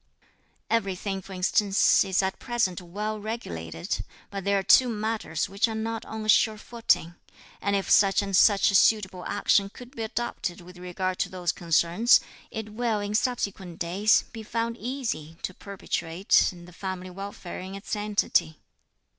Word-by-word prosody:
Everything, 195 Hz, -3 st, -1 dB
for 195 Hz, -, -13 dB
instance, 195 Hz, +2 st, +3 dB
is 190 Hz, -1 st, +1 dB
at 190 Hz, 0 st, -2 dB
present 235 Hz, -8 st, -1 dB
well 210 Hz, +5 st, -4 dB
regulated; 85 Hz, -, -4 dB, 0.3 s
but 195 Hz, -1 st, -5 dB
there 200 Hz, +1 st, +2 dB
are 195 Hz, -, 0 dB
two 250 Hz, +6 st, +6 dB
matters 215 Hz, -7 st, -2 dB
which 200 Hz, +4 st, +1 dB
are 225 Hz, -, -4 dB
not 225 Hz, +1 st, -3 dB
on 220 Hz, 0 st, -5 dB
a -, -, -5 dB
sure 215 Hz, 0 st, +4 dB
footing, 220 Hz, -7 st, 0 dB, 0.5 s
and 200 Hz, 0 st, +1 dB
if 195 Hz, -, -1 dB
such 195 Hz, 0 st, +5 dB
and 195 Hz, -1 st, -1 dB
such 200 Hz, +1 st, +5 dB
suitable 190 Hz, -3 st, +3 dB
action 200 Hz, -1 st, +2 dB
could 245 Hz, +5 st, -13 dB
be 230 Hz, -, -5 dB
adopted 220 Hz, -5 st, -3 dB
with 180 Hz, 0 st, -13 dB
regard 180 Hz, +1 st, -3 dB
to -, -, 0 dB
these 180 Hz, -2 st, -1 dB
concerns, 170 Hz, +7 st, +3 dB, 0.3 s
it 220 Hz, -2 st, -6 dB
will, 225 Hz, -1 st, 0 dB
in 205 Hz, 0 st, -3 dB
subsequent 200 Hz, -7 st, -1 dB
days, 190 Hz, +5 st, +3 dB
be 225 Hz, -, -7 dB
found 230 Hz, +1 st, -2 dB
easy 225 Hz, -, -4 dB
to 185 Hz, -, -3 dB
perpetuate 190 Hz, -2 st, 0 dB
the 175 Hz, -1 st, -13 dB
family 185 Hz, 0 st, -5 dB
welfare 195 Hz, -1 st, -7 dB
in 190 Hz, +1 st, -7 dB
its 200 Hz, +2 st, -4 dB
entity." 205 Hz, -6 st, +1 dB
200 Hz, 160 wpm, -26 LUFS, 180-220 Hz, 0.5 s, two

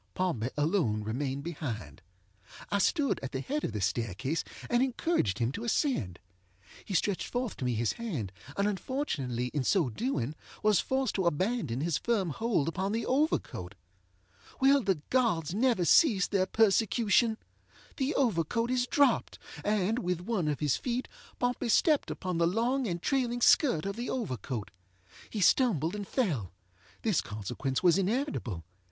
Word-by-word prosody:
Pompey 150 Hz, -11 st, -1 dB
alone 145 Hz, -, +1 dB
remained 135 Hz, +5 st, -3 dB
behind. 115 Hz, -, -5 dB, 0.7 s
I 200 Hz, -, +2 dB
stood 285 Hz, -, +2 dB
at 135 Hz, -, -6 dB
the 130 Hz, -, -1 dB
head 295 Hz, -, -3 dB
of -, -, -1 dB
the 105 Hz, -1 st, -4 dB
staircase, 110 Hz, -, -1 dB, 0.2 s
and 240 Hz, 0 st, +2 dB
encouraged 255 Hz, -, 0 dB
him 115 Hz, +1 st, 0 dB
to 220 Hz, -, -6 dB
ascend. 225 Hz, -, 0 dB, 0.7 s
He 195 Hz, -, -4 dB
stretched 195 Hz, +2 st, 0 dB
forth 245 Hz, -2 st, -2 dB
to 130 Hz, -, -4 dB
me 125 Hz, -2 st, 0 dB
his 115 Hz, 0 st, +1 dB
hand, 155 Hz, -, -4 dB, 0.3 s
and 200 Hz, +1 st, +2 dB
unfortunately 155 Hz, -, -2 dB
in 145 Hz, -3 st, 0 dB
so 160 Hz, -, +2 dB
doing 150 Hz, -, -2 dB, 0.3 s
was 210 Hz, -4 st, +4 dB
forced 265 Hz, -3 st, 0 dB
to 190 Hz, -3 st, 0 dB
abandon 170 Hz, -, 0 dB
his 165 Hz, -1 st, 0 dB
firm 205 Hz, -8 st, 0 dB
hold 210 Hz, -, 0 dB
upon 190 Hz, +4 st, -1 dB
the 230 Hz, -, -1 dB
overcoat. 255 Hz, -, -1 dB, 0.8 s
Will 275 Hz, +1 st, +5 dB
the 190 Hz, -8 st, 0 dB
gods 215 Hz, -, +1 dB
never 225 Hz, -4 st, +2 dB
cease 210 Hz, -, +5 dB
their 190 Hz, -2 st, +1 dB
persecution? 220 Hz, +1 st, +3 dB, 0.6 s
The 275 Hz, +2 st, 0 dB
overcoat 230 Hz, -, +1 dB
is 250 Hz, -1 st, +1 dB
dropped, 285 Hz, +1 st, +2 dB, 0.3 s
and, 210 Hz, +2 st, +1 dB
with 180 Hz, -6 st, -2 dB
one 190 Hz, -4 st, -1 dB
of 150 Hz, -1 st, -1 dB
his 145 Hz, -4 st, +2 dB
feet, 250 Hz, 0 st, -2 dB, 0.3 s
Pompey 245 Hz, -1 st, -1 dB
stepped 300 Hz, -, +3 dB
upon 180 Hz, -2 st, -3 dB
the 170 Hz, -, +4 dB
long 240 Hz, +7 st, +1 dB
and 175 Hz, -3 st, -2 dB
trailing 245 Hz, -3 st, 0 dB
skirt 235 Hz, -, +4 dB
of 200 Hz, +2 st, -3 dB
the 240 Hz, +1 st, -3 dB
overcoat. 130 Hz, -, -4 dB, 0.6 s
He 210 Hz, -, -3 dB
stumbled 185 Hz, -, +3 dB
and 205 Hz, -2 st, -5 dB
fellŌĆöthis 100 Hz, -, -2 dB
consequence 110 Hz, -, -3 dB
was 180 Hz, +1 st, +5 dB
inevitable. 195 Hz, -, -2 dB
190 Hz, 155 wpm, -30 LUFS, -, 0.8 s, Will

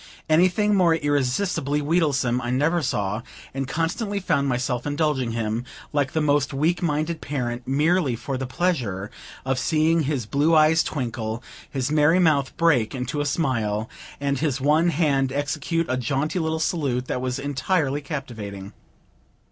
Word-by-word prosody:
Anything 185 Hz, +6 st, +3 dB
more 175 Hz, -4 st, +4 dB
irresistibly 145 Hz, +1 st, 0 dB
wheedlesome 145 Hz, -6 st, +1 dB
I 120 Hz, -, -3 dB
never 150 Hz, +7 st, +2 dB
saw, 105 Hz, -6 st, -1 dB, 0.3 s
and 135 Hz, 0 st, -3 dB
constantly 190 Hz, -, -1 dB
found 140 Hz, -7 st, +1 dB
myself 125 Hz, 0 st, -1 dB
indulging 145 Hz, -5 st, 0 dB
him, 115 Hz, 0 st, -2 dB, 0.3 s
like 145 Hz, -2 st, 0 dB
the 160 Hz, -, +1 dB
most 145 Hz, -2 st, +1 dB
weak 160 Hz, +4 st, +1 dB
minded 155 Hz, 0 st, -1 dB
parent, 125 Hz, -4 st, -3 dB
merely 150 Hz, 0 st, +2 dB
for 120 Hz, +4 st, -4 dB
the 130 Hz, 0 st, -3 dB
pleasure 125 Hz, -, -1 dB, 0.3 s
of 135 Hz, -1 st, 0 dB
seeing 160 Hz, +1 st, +2 dB
his 135 Hz, -5 st, -1 dB
blue 145 Hz, +8 st, +2 dB
eyes 155 Hz, +1 st, +5 dB
twinkle, 115 Hz, -4 st, -3 dB, 0.3 s
his 135 Hz, 0 st, -2 dB
merry 155 Hz, +3 st, +4 dB
mouth 155 Hz, -7 st, +2 dB
break 140 Hz, -9 st, +2 dB
into 130 Hz, +3 st, -2 dB
a 145 Hz, -, -1 dB
smile, 115 Hz, -8 st, 0 dB, 0.3 s
and 140 Hz, -1 st, -1 dB
his 145 Hz, -4 st, 0 dB
one 150 Hz, +5 st, +3 dB
hand 140 Hz, -5 st, +1 dB
execute 145 Hz, +4 st, -1 dB
a 130 Hz, -, 0 dB
jaunty 140 Hz, +7 st, -1 dB
little 160 Hz, -1 st, -1 dB
salute 140 Hz, -7 st, -1 dB
that 125 Hz, -, -3 dB
was 125 Hz, -1 st, -2 dB
entirely 145 Hz, +1 st, 0 dB
captivating. 110 Hz, -, -6 dB
145 Hz, 150 wpm, -24 LUFS, 125-160 Hz, 0.3 s, eyes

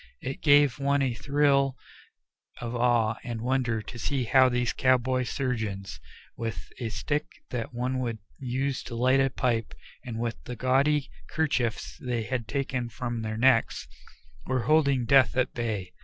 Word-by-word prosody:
It 130 Hz, +1 st, -5 dB
gave 145 Hz, -4 st, +5 dB
one 140 Hz, 0 st, +2 dB
a 130 Hz, -3 st, 0 dB
thrill 140 Hz, 0 st, +2 dB, 0.8 s
of 120 Hz, 0 st, -4 dB
awe 120 Hz, -2 st, +2 dB
and 120 Hz, -2 st, -4 dB
wonder 120 Hz, -2 st, 0 dB
to 120 Hz, -, -9 dB
see 135 Hz, +1 st, -1 dB
how 130 Hz, +2 st, +5 dB
these 125 Hz, -1 st, 0 dB
cowboy 130 Hz, 0 st, +2 dB
surgeons, 110 Hz, -8 st, -3 dB, 0.4 s
with 100 Hz, -9 st, -5 dB
a 115 Hz, -, -2 dB
stick 145 Hz, +6 st, -2 dB, 0.2 s
that 120 Hz, -3 st, -3 dB
one 125 Hz, +2 st, -2 dB
would 120 Hz, -3 st, -2 dB, 0.2 s
use 130 Hz, +1 st, -2 dB
to 120 Hz, -, -6 dB
light 130 Hz, +3 st, +3 dB
a 135 Hz, 0 st, +3 dB
pipe 115 Hz, -4 st, -1 dB, 0.3 s
and 115 Hz, -2 st, -5 dB
with 115 Hz, -1 st, -3 dB
the 125 Hz, -, -5 dB
gaudy 135 Hz, +4 st, +2 dB, 0.2 s
'kerchiefs 130 Hz, -8 st, -1 dB
they 120 Hz, -3 st, -2 dB
had 120 Hz, -1 st, -3 dB
taken 130 Hz, -3 st, -2 dB
from 120 Hz, 0 st, -4 dB
their 110 Hz, 0 st, -3 dB
necks, 120 Hz, -1 st, +3 dB, 0.6 s
were 130 Hz, -2 st, 0 dB
holding 140 Hz, -2 st, +3 dB
death 130 Hz, 0 st, +5 dB
at 130 Hz, -, +1 dB
bay. 105 Hz, -6 st, -3 dB
125 Hz, 155 wpm, -27 LUFS, 115-135 Hz, 0.8 s, gave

